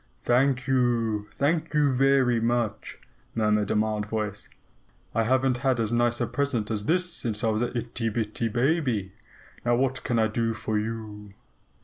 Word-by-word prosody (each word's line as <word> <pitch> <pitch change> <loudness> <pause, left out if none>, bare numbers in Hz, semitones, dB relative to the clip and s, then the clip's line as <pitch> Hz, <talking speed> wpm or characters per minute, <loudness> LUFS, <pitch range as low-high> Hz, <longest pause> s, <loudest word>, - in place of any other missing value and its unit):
"Thank 130 +1 +2
you. 120 -5 +1
Thank 155 +2 0
you 145 -2 +4
very 130 -2 +3
much!" 115 -2 -1 0.4
murmured 105 -2 +1
a - - +1
mild 105 0 0
voice. 105 -2 -4 0.6
"I 115 - +2
haven't 130 +1 +2
had 130 -1 +1
as 115 0 -1
nice 120 0 +2
a 120 - +1
present 125 -5 -1
as 105 -1 -2
this 180 +1 +1
since 110 -6 -2
I 115 - +3
was 110 +1 -1
an 120 0 -2
itty 115 -1 -2
bitty 110 +1 -2
baby. 120 - 0 0.5
Now 120 0 +2
what 130 +1 0
can 120 - 0
I 110 - +4
do 115 +1 -1
for 110 0 -1
YOU?" 105 -1 -6
120 Hz, 165 wpm, -26 LUFS, 110-130 Hz, 0.6 s, you